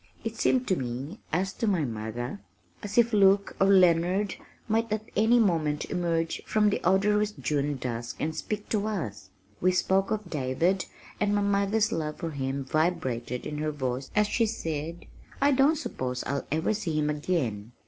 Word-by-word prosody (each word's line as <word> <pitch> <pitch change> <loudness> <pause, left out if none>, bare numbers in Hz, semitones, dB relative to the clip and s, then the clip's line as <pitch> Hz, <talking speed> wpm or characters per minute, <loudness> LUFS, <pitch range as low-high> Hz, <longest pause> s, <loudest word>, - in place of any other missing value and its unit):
It 225 0 -4
seemed 255 +2 +2
to 185 - +3
me 135 - -5
(as 190 +4 0
to 230 - -2
my 180 -7 +2
mother) 115 - -4 0.4
as 205 +2 -6
if 235 -1 +4
Luke 200 -1 +4
or 195 - +6
Leonard 185 +1 +4 0.3
might 225 0 0
at 215 0 -1
any 225 +3 +4
moment 165 -9 +1
emerge 165 -2 -1
from 210 -1 +3
the - - -1
odorous 210 +3 +3
June 145 -5 -1
dusk 120 -2 -4
and 155 0 -2
speak 210 -1 -4
to 215 -1 0
us. 105 - -4 0.3
We 185 - +4
spoke 190 +1 +2
of 215 -3 -2
David, 160 +7 0 0.3
and 205 0 +2
my 205 - +2
mother's 200 +2 +2
love 155 -6 -2
for 165 - -4
him 135 -1 -3
vibrated 130 -6 -1
in 150 -1 -4
her 155 0 0
voice 130 -3 -3
as 210 0 +4
she 225 +2 +1
said, 165 -5 -4 0.3
"I 285 - +4
don't 275 +4 +4
suppose 130 - -3
I'll 140 0 -3
ever 160 +7 +1
see 175 -7 -2
him 150 0 +1
again. 130 - -2
175 Hz, 175 wpm, -28 LUFS, 145-210 Hz, 0.4 s, or